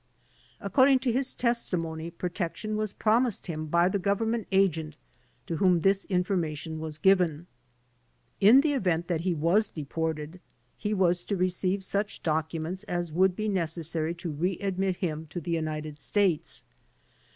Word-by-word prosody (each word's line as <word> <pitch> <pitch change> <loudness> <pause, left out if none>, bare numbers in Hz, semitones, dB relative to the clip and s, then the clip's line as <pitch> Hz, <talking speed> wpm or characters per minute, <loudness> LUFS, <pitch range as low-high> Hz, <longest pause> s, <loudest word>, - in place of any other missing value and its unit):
According 265 0 +4
to 260 -2 +1
his 260 +2 -1
testimony, 170 -9 -1
protection 180 +4 -4
was 215 -1 -1
promised 230 +1 +1
him 155 -3 -4
by 170 +3 +3
the 195 +2 0
Gov 200 +2 +1
ernment 225 -1 -1
Agent 165 -6 +1 0.5
to 170 -4 -3
whom 180 -2 +3
this 195 +2 +2
information 170 -4 -1
was 155 -1 -5
given. 175 -3 +3 0.9
In 225 +7 +7
the 295 0 +1
event 175 -9 0
that 165 -2 0
he 175 0 0
was 175 +8 +2
deported 160 +2 -4 0.4
he 210 - -3
was 180 -2 +2
to 200 - -1
receive 185 +1 0
such 200 +2 -2
documents 160 +3 -2
as 175 -4 -3
would 185 +2 +3
be 215 +2 -2
necessary 165 -3 0
to 170 -1 -5
re 175 +5 -1
admit 195 -1 -1
him 160 -3 -3
to 150 +4 -5
the 170 +1 -5
United 155 -2 -3
States. 190 -2 0
180 Hz, 150 wpm, -28 LUFS, 160-200 Hz, 0.9 s, In